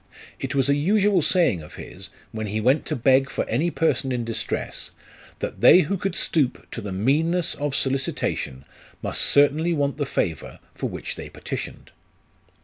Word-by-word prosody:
It 135 +1 -4
was 135 -1 +2
a 140 - +4
usual 195 +5 +3
saying 155 - +2
of 75 - -12
his, - - -9 0.2
when 110 -1 -4
he 105 +2 -2
went 130 +7 +2
to - - -1
beg 135 +2 +3
for - - -2
any 145 +10 +1
person 160 -5 0
in 125 -1 -1
distress, 115 -1 -3 0.5
that - - -5
they 185 - +8
who 180 +5 -1
could 195 +1 -3
stoop 140 -6 0
to 115 - -5
the 100 -2 -6
meanness 155 - +1
of 145 -1 -2
solicitation 135 - -1 0.4
must - - -1
certainly 150 +4 +4
want 140 -3 0
the 145 -3 -2
favour 80 - -2 0.2
for - - -3
which - - -6
they - - -7
petitioned. - - -7
140 Hz, 170 wpm, -24 LUFS, 120-165 Hz, 0.5 s, they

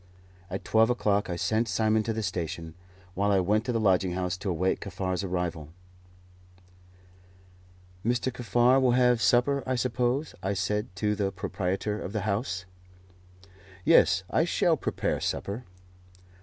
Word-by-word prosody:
At 95 +1 -5
twelve 110 +1 +4
o'clock 105 -5 +1
I 90 - -2
sent 110 +6 0
Simon 110 0 +2
to 115 - -2
the 110 0 -3
station, 85 -3 -4 0.4
while 100 +2 +1
I 100 - +4
went 105 +4 +1
to 125 - -1
the 115 - 0
lodging 95 -3 +2
house 90 0 -2
to 100 +1 -4
await 90 +2 0
Kaffar's 95 0 -3
arrival. 90 -5 -3 2.3
"Mr. 120 +2 0
Kaffar 120 +3 +3
will 125 -2 +3
have 125 -1 +3
supper, 130 +5 +3
I 130 - +1
suppose?" 125 +3 -1
I 100 +1 -1
said 105 +3 -1
to 105 +1 0
the 100 -2 -1
proprietor 95 +2 -3
of 95 - -6
the 110 - -1
house. 100 -2 -2 1.2
"Yes, - - +5
I - - +2
shall - - +2
prepare - - -2
supper." 110 +5 -3
105 Hz, 145 wpm, -28 LUFS, 95-120 Hz, 2.3 s, Yes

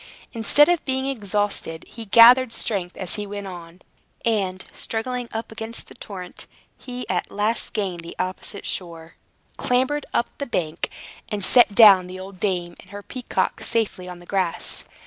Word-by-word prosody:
Instead 250 +6 +4
of 350 -2 +2
being 265 0 -1
exhausted, 205 -9 -2
he 230 -1 -9
gathered 235 +4 +8
strength 195 -6 -3
as 185 -2 -3
he 205 0 -4
went 205 0 -6
on; 175 -1 -10 0.4
and, 195 -5 0
struggling 245 +2 -3
up 225 0 -5
against 225 +1 -6
the - - -12
torrent, 185 -6 -9 0.3
he 250 0 -7
at - - -1
last 210 +3 -1
gained 190 -5 -2
the 170 - -9
opposite 185 +2 -3
shore, 165 -2 -4 0.4
clambered 260 +4 0
up 235 - -1
the 280 - -3
bank, 165 -7 -2 0.4
and 205 -3 -2
set 240 -5 +5
down 195 -5 +8
the 185 +1 -8
old 190 0 -10
dame 175 -3 -1
and 185 - -16
her 205 +1 -8
peacock 255 +3 -2
safely 200 -5 -1
on 180 - -8
the 175 - -15
grass. 185 -3 0
205 Hz, 165 wpm, -23 LUFS, 185-235 Hz, 0.4 s, gathered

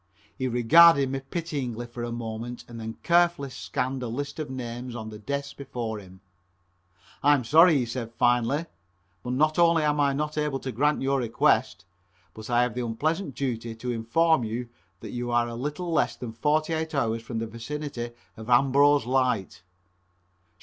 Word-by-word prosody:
He 130 - -2
regarded 140 +4 +6
me 135 - -2
pityingly 135 -5 -4
for 120 0 -8
a 120 - -4
moment 115 +1 -6
and 115 -1 -9
then 110 0 -6
carefully 170 -5 +2
scanned 130 +1 -3
a 125 - -3
list 140 +6 -5
of 155 - -4
names 120 -1 -6
on 110 -2 -6
the 105 -1 -9
desk 140 +4 -4
before 120 -5 -5
him. 95 -1 -15 1.0
"I 145 +1 +5
am 130 - -2
sorry," 160 +6 +6
he 125 - 0
said 115 -1 -5
finally, 120 +6 +1 0.6
"but 125 +4 -4
not 155 +5 +2
only 170 -2 +4
am 150 0 +1
I 140 -1 +3
not 150 +2 -2
able 150 -2 -1
to 130 - -4
grant 145 +5 +1
your 135 0 +1
request, 115 -5 +1 0.5
but 110 +1 -10
I 120 0 +3
have 125 -2 -1
the 125 - -3
unpleasant 145 - -2
duty 115 -4 -3
to 125 +2 -4
inform 125 +6 +2
you 115 +2 -4 0.3
that - - -7
you 120 0 -4
are 120 0 +2
a 120 - -6
little 150 +8 -4
less 160 - +1
than 115 -3 -7
forty 155 +6 +1
eight 160 0 -2
hours 115 -4 0
from 115 0 -6
the 115 - -2
vicinity 120 +2 -5 0.3
of 110 +2 -10
Ambrose 140 +2 +4
light." 125 -9 0
125 Hz, 180 wpm, -26 LUFS, 115-145 Hz, 1.0 s, regarded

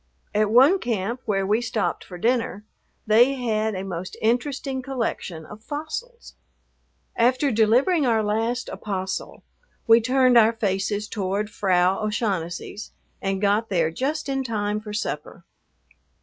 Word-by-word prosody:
At 210 0 +2
one 270 - +6
camp, 230 - -2
where 195 -2 0
we 215 +4 +2
stopped 225 -3 -2
for 180 - -10
dinner, 225 -1 0 0.4
they 240 +5 +5
had 220 -4 -1
a 185 - -4
most 185 -1 -6
interesting 260 +3 -1
collection 230 - -4
of 210 +5 -12
fossils. 315 - -6 0.8
After 255 +4 +2
delivering 250 - +3
our 225 -2 +2
last 225 +4 -1
"apostle," 190 -2 -5 0.4
we 230 0 +6
turned 255 0 +4
our 225 0 +5
faces 205 -1 -1
toward 205 0 -2
Frau 185 -2 +2
O'Shaughnessy's, 200 -2 -3 0.3
and 195 0 -1
got 205 +3 +1
there 165 -4 +1
just 290 - -2
in 270 -1 -1
time 210 -3 -2
for 215 0 -9
supper. 210 - -5
220 Hz, 135 wpm, -24 LUFS, 200-250 Hz, 0.8 s, one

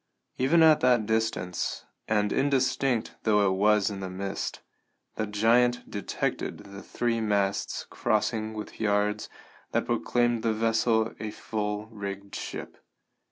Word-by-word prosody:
Even 155 +6 +5
at 155 -1 +7
that 125 -3 +3
distance, 110 -5 -1 0.2
and 105 -1 +1
indistinct 135 -3 +1
though 105 -2 +3
it 95 - +3
was 105 +1 +3
in 100 - -5
the 95 -1 -4
mist, 95 +1 -4 0.5
the 110 - -2
giant 115 +4 +3
detected 100 -2 -2
the 100 0 -10
three 115 -1 -1
masts 100 -2 0
crossed 110 +3 0
with 110 -1 -5
yards 105 0 +1 0.4
that - - +1
proclaimed 120 +7 +1
the 115 -1 +1
vessel 115 0 +1
a 110 - -4
full 105 -1 -3
rigged 100 -2 -6
ship. - - -6
110 Hz, 130 wpm, -28 LUFS, 100-115 Hz, 0.5 s, at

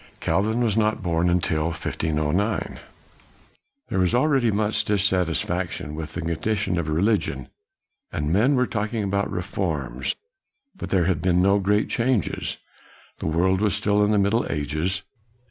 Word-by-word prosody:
Calvin 105 +8 +1
was 110 -4 +2
not 110 -3 +1
born 85 0 +1
till 80 -2 0
1509. 80 +4 -1 1.1
There 95 - 0
was 90 +4 +2
already 130 -2 +3
much 105 +1 +1
dissatisfaction 95 -7 0
with 80 0 -6
the 90 - -3
condition 90 +3 -1
of 80 - -3
religion, 80 - 0 0.6
and 75 +2 -1
men 120 +9 +4
were 125 0 +3
talking 110 -1 -2
about 100 0 0
reforms, 80 -9 -2 0.6
but - - -6
there 90 -3 +2
had 90 -4 0
been 90 +1 +2
no 100 +2 +4
great 105 +2 +2
changes. 115 -4 0 0.6
The - - -3
world 95 +4 +2
was 105 -3 +2
still 105 -1 +2
in 105 - +2
the 105 - +3
Middle 100 +4 +2
Ages. 75 +6 -1
95 Hz, 145 wpm, -24 LUFS, 80-105 Hz, 1.1 s, men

